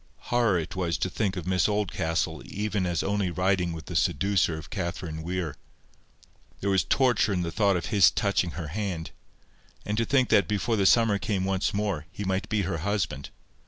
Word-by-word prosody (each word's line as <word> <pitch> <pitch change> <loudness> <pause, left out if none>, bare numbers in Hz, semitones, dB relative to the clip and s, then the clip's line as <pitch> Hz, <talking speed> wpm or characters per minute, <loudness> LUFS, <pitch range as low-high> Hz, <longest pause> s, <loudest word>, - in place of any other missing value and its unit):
Horror 120 -6 +3
it 85 +1 -4
was 85 -3 -1
to 95 - -2
think 100 -2 -1
of 90 - -4
Miss 90 +1 +2
Oldcastle 90 -6 -1
even 105 -2 -2
as 85 -2 -1
only 100 -1 0
riding 90 0 +1
with 80 -1 -7
the 85 - -7
seducer 85 +1 +2
of 80 - -10
Catherine 85 -4 -4
Weir. 85 -3 -3 1.0
There 100 - 0
was 95 -1 +3
torture 125 -6 +2
in 90 -2 0
the 85 - -3
thought 100 +1 +2
of 85 - -4
his 100 -4 +7
touching 95 -4 0
her 80 -4 -4
hand; 90 -2 -4 0.7
and 105 +1 -1
to 115 - +2
think 130 -1 +2
that 100 -5 +4
before 105 +3 0
the 100 -3 +3
summer 115 -3 +4
came 95 -1 -1
once 95 0 0
more, 100 -6 -2
he 105 - -6
might 95 0 -1
be 105 -2 +1
her 85 -3 -2
husband! 85 -7 -2
95 Hz, 195 wpm, -27 LUFS, 85-105 Hz, 1.0 s, his